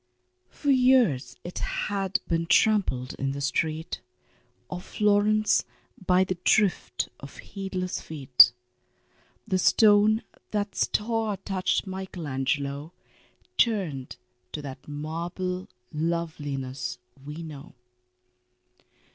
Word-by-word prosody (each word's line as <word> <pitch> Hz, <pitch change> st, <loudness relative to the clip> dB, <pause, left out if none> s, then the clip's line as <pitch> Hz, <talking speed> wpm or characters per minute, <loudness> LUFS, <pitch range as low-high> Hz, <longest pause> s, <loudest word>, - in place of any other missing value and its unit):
For 285 Hz, -, 0 dB
years 245 Hz, -, +4 dB
it 175 Hz, -, -6 dB
had 195 Hz, -2 st, -1 dB
been 165 Hz, -1 st, 0 dB
trampled 185 Hz, -, +3 dB
in 135 Hz, 0 st, -1 dB
the 140 Hz, -, -5 dB
street 160 Hz, +4 st, -1 dB, 0.7 s
Of 180 Hz, 0 st, -6 dB
Florence 210 Hz, +1 st, +3 dB, 0.4 s
by 185 Hz, 0 st, +4 dB
the 185 Hz, -2 st, -3 dB
drift 195 Hz, -, +2 dB
of 140 Hz, -, -11 dB
heedless 190 Hz, -2 st, -4 dB
feet 135 Hz, -6 st, +6 dB, 1.0 s
The 185 Hz, -, +1 dB
stone 215 Hz, +2 st, +5 dB, 0.3 s
that 205 Hz, -1 st, -2 dB
star 220 Hz, -1 st, 0 dB
touched 190 Hz, 0 st, -1 dB
Michael 190 Hz, -3 st, -6 dB
Angelo 140 Hz, +3 st, -2 dB, 0.7 s
Turned 180 Hz, -, +1 dB, 0.4 s
to 150 Hz, -, -5 dB
that 135 Hz, -2 st, -9 dB
marble 170 Hz, +5 st, -4 dB, 0.2 s
loveliness 145 Hz, -5 st, -3 dB, 0.3 s
we 150 Hz, +4 st, -7 dB
know. 145 Hz, -5 st, -10 dB
175 Hz, 95 wpm, -27 LUFS, 145-205 Hz, 1.0 s, feet